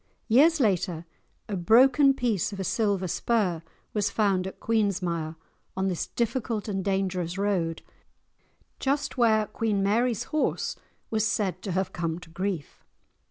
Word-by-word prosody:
Years 300 +8 +5
later, 180 - 0 0.4
a 205 - -3
broken 260 - +5
piece 225 -7 0
of 200 - -7
a - - -1
silver 200 -2 0
spur 185 -3 0 0.3
was 205 -1 +1
found 195 -3 +1
at 190 - -9
Queensmire, 180 -7 0 0.4
on 190 0 +1
this 180 - -2
difficult 230 -2 -2
and 195 -2 -2
dangerous 190 -3 -1
road, 185 -5 -1 1.0
just 280 +1 -1
where 220 -4 +3
Queen 210 -1 -1
Mary's 230 +3 +1
horse 305 - 0 0.4
was 220 -1 +1
said 195 -4 0
to 195 - -4
have 190 +1 -1
come 165 -2 -2
to 180 -2 -13
grief. 180 -3 -4
200 Hz, 140 wpm, -27 LUFS, 180-225 Hz, 1.0 s, Years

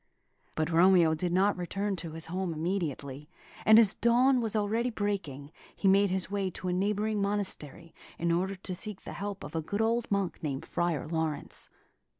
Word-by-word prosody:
But 155 +2 -1
Romeo 170 -1 +5
did 170 +2 -2
not 195 +3 +3
return 195 +3 -2
to 165 -2 -5
his 160 0 -4
home 180 0 -3
immediately; 155 -4 -3 0.4
and 220 0 +9
as 220 -3 +6
dawn 250 +2 +3
was 225 -1 -2
already 220 +4 +1
breaking, 185 - -3 0.2
he 195 - 0
made 200 +1 +5
his 185 0 -2
way 200 -2 0
to 185 +1 -5
a - - 0
neighbouring 210 +3 0
monastery, 190 -5 -3 0.2
in 170 0 0
order 185 +3 0
to 185 0 -6
seek 200 +2 -7
the - - -7
help 200 0 -5
of - - -8
a 160 - 0
good 200 +6 -4
old 230 +1 +1
monk 200 -3 -1
named 145 0 -3
Friar 170 -3 -1
Laurence. 160 -2 -2
190 Hz, 180 wpm, -30 LUFS, 165-205 Hz, 0.4 s, and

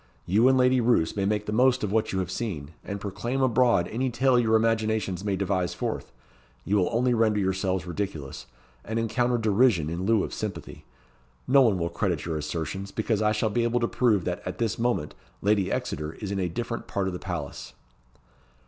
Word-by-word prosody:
You 105 +8 +4
and 130 0 +5
Lady 125 0 +4
Roos 115 -9 +2
may 100 -1 0
make 105 +1 0
the 105 - -3
most 125 +2 +3
of 105 - -1
what 110 0 +1
you 95 - -2
have 95 -1 -2
seen; 80 -11 -4
and 100 0 -5
proclaim 120 +6 -3
abroad 120 -7 +3
any 130 +4 -1
tale 130 +1 +3
your 110 -2 +3
imaginations 110 -4 0
may 100 -2 0
devise 95 -2 -1
forth. - - -4 0.5
You 105 - +2
will 90 - +2
only 125 +2 +2
render 110 -2 +2
yourselves 95 -1 -1
ridiculous, 85 -8 -5 0.4
and 110 +1 -4
encounter 120 +2 +1
derision 110 -7 +2
in 90 +3 -3
lieu 110 -3 +3
of - - -5
sympathy. - - -6 0.6
No 135 +1 +6
one 110 -7 +4
will 85 -1 -1
credit 85 -1 -2
your 80 -2 -2
assertions, 85 +6 -4
because 110 +1 -1
I 105 0 +3
shall 110 0 0
be 120 - +1
able 120 +1 +1
to 120 - +1
prove 110 -9 +2
that, - - -2
at - - -5
this 115 -3 -1
moment, 115 -11 0 0.3
Lady 100 -2 +2
Exeter 75 +1 -3
is 100 +2 -6
in 100 - -1
a 90 -2 0
different 115 +6 -4
part 100 - -1
of 95 - -2
the 90 - -5
palace." 85 -6 -6
105 Hz, 200 wpm, -26 LUFS, 95-115 Hz, 0.6 s, No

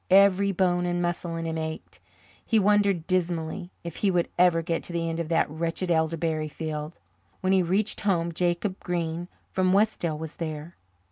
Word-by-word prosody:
Every 200 +1 +6
bone 180 -1 +1
and 175 0 0
muscle 175 -1 -2
in 165 0 -3
him 160 0 -2
ached. 160 0 -6 0.4
He 225 - +2
wondered 200 -4 +3
dismally 175 -1 -1
if 170 - -6
he 205 - +2
would 175 -2 +1
ever 175 -2 +4
get 165 0 -1
to 175 - -6
the 165 -1 -1
end 165 0 -2
of 165 -2 -3
that 165 -1 +3
wretched 165 +3 -2
elderberry 160 -1 +1
field. 155 0 -5 0.4
When 185 0 +2
he 190 - +5
reached 195 +5 0
home 170 -5 +1
Jacob 175 +3 -1
Green 170 -1 -2 0.2
from 185 -1 +2
Westdale 195 -6 +2
was 160 0 -7
there. 155 0 -5
175 Hz, 180 wpm, -27 LUFS, 165-185 Hz, 0.4 s, Every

